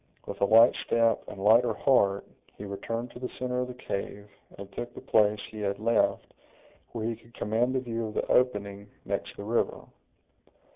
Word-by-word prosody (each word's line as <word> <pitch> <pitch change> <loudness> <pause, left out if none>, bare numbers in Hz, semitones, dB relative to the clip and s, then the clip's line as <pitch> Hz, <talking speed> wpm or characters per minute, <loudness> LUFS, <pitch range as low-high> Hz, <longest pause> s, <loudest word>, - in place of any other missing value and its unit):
With - - -7
a - - +5
light 115 +4 +7
step 115 -1 +2
and - - -9
lighter 110 +3 +4
heart, 100 -8 +2 0.3
he 105 - -7
returned 115 +4 -4
to - - -11
the 125 - -4
center 125 0 -2
of 125 - -1
the 125 - -8
cave, 100 -3 -5 0.3
and 100 0 -9
took 120 - -6
the - - -7
place 105 -1 +3
he 110 - -8
had 100 -1 -1
left, 115 +3 +1 0.6
where 115 -2 -4
he 115 0 -1
could 115 +1 -21
command 120 +4 0
a 130 - +1
view 115 -2 -3
of 110 - -9
the - - 0
opening 100 -5 0 0.2
next - - -4
the - - -6
river. 115 +3 0
115 Hz, 190 wpm, -28 LUFS, 100-120 Hz, 0.6 s, light